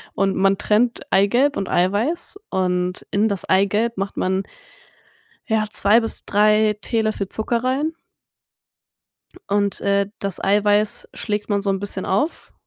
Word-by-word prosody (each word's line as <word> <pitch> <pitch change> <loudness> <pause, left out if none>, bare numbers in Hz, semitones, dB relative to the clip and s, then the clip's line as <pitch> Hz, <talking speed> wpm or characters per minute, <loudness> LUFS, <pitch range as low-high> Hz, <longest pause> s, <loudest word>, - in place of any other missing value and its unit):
und 195 0 +1
man 195 0 +2
trennt 230 +3 +1
Eigelb 240 +9 +3
und 195 - -3
Eiweiß 225 - 0
und 180 -1 -1
in 205 +2 +2
das 200 -4 -3
Eigelb 205 +4 +1
macht 195 0 -4
man 190 +1 0 1.1
ja, 220 -1 +2
2 210 +3 +4
bis 225 - -4
3 210 +1 +3
Teelöffel 215 -3 -1
Zucker 230 +4 -1
rein 275 +5 0 1.6
und, 200 0 0
äh, 200 0 +1
das 195 -2 -3
Eiweiß 205 +1 +2
schlägt 210 0 -3
man 200 -1 +1
so 200 - 0
'n 195 - 0
bisschen 195 -1 -3
auf, 210 - -2
205 Hz, 135 wpm, -21 LUFS, 195-220 Hz, 1.6 s, 2